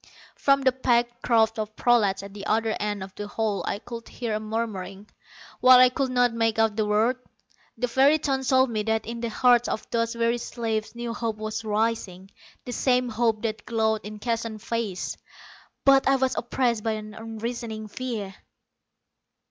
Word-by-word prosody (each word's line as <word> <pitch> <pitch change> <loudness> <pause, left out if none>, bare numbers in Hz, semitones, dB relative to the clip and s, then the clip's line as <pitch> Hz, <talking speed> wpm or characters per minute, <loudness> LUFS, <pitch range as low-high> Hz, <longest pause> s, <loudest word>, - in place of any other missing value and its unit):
From 275 -1 +2
the 260 - +5
packed 240 -1 0
crowd 225 -1 +2
of 215 0 -4
prolats 205 -6 +2
at 200 0 -10
the 205 0 -7
other 220 0 +1
end 205 -2 -2
of 190 0 -10
the 205 - -6
hall 210 -1 -1
I - - -1
could 230 +1 -9
hear 235 -3 -4
a 215 - 0
murmuring. 210 -3 -5 0.5
While 255 0 +8
I 255 0 +7
could 265 +1 -1
not 245 -1 +2
make 225 -1 +1
out 225 -1 +2
the 215 -1 0
words, 225 +5 +2 0.6
the 250 - 0
very 270 +5 +4
tones 270 -3 -1
told 260 -1 +4
me 215 -2 -1
that 220 +1 -1
in 235 +1 -5
the 235 - -2
hearts 245 +1 +4
of 215 - -4
those 230 0 0
weary 235 +1 +1
slaves 225 -2 -3
new 235 -1 -4
hope 230 -2 -3
was 215 +1 -4
rising, 210 -3 -2 0.3
the 245 - -5
same 250 0 +1
hope 225 -1 0
that 220 -1 -3
glowed 220 -2 +1
in 210 +1 -8
Keston's 230 -1 -3
face. 225 -6 -3 0.7
But 275 -1 +6
I 270 - +5
was 265 -1 0
oppressed 240 -2 0
by 225 - 0
an 215 0 -7
unreasoning 225 0 -5
fear. 215 -4 -5
225 Hz, 180 wpm, -25 LUFS, 215-240 Hz, 0.7 s, While